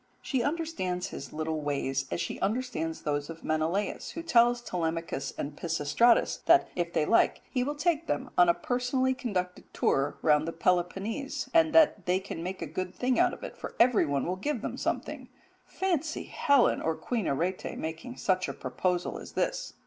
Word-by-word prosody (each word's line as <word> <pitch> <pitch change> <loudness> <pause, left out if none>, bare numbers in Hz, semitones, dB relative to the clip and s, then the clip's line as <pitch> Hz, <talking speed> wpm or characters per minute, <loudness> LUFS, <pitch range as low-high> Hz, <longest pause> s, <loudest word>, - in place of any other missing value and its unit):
She 260 -4 0
understands 285 - -2
his - - -8
little 155 0 -2
ways 135 -2 -1
as 85 - -2
she 85 - -3
understands 205 -7 -2
those 145 0 -1
of 165 0 -9
Menelaus, 160 +6 -1
who 330 - -6
tells 240 -6 +4
Telemachus 165 - -2
and 145 +1 -4
Pisistratus 165 +9 +2
that 345 +1 +6
if 175 -1 -1
they 150 - +1
like 230 - +3
he 250 -2 +1
will 290 +3 -2
take 330 +1 0
them 260 - -2
a 175 -1 +6
personally 255 +1 0
conducted 185 -8 -4
tour 135 +2 +1
round 150 0 +4
the 165 - -3
Peloponnese, 195 - -1
and 325 -1 +5
that 295 - +5
they 180 +1 +3
can 190 -3 -6
make 185 +2 -4
a - - -2
good 185 0 -5
thing 250 +3 +1
out - - +4
of - - -9
it, - - -6
for - - -8
everyone 165 - +3
will 180 +2 -2
give 290 +10 -2
them - - -3
something - - -3 0.4
fancy 330 -5 -1
Helen 280 -3 +3
or 160 0 0
Queen 230 0 -2
Arete 175 +7 -2
making 165 +11 -6
such 185 -1 0
a - - -3
proposal 175 +8 -2
as - - -11
this. - - -2
185 Hz, 180 wpm, -29 LUFS, 160-255 Hz, 0.4 s, that